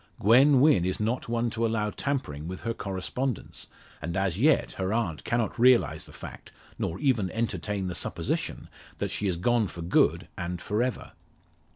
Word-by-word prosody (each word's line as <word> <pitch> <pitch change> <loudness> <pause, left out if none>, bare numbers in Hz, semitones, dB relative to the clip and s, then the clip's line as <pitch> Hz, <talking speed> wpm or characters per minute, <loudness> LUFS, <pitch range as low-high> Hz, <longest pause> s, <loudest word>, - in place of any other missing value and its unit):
Gwen 130 +6 +6
Wynn 145 - +5
is 95 +1 -1
not 115 +3 -1
one 120 0 0
to 115 +1 -2
allow 110 -2 0
tampering 85 - -3
with 90 +1 -6
her 115 - -2
correspondence; 105 +5 -4 0.3
and 85 +3 -3
as 95 -1 0
yet 150 +5 +3
her 95 0 -3
aunt 105 -9 -1
cannot 120 -1 -1
realise 125 0 +4
the - - -13
fact - - -10 0.3
nor 85 - -2
even 115 -6 +1
entertain 105 -3 -2
the 90 - -3
supposition - - -3 0.3
that - - -2
she 105 - -2
is 90 -3 0
gone 115 +4 +2
for 85 -1 -7
good 85 - +2
and 90 0 -4
for 105 +5 -1
ever. 125 0 -2
110 Hz, 175 wpm, -27 LUFS, 95-120 Hz, 0.3 s, Gwen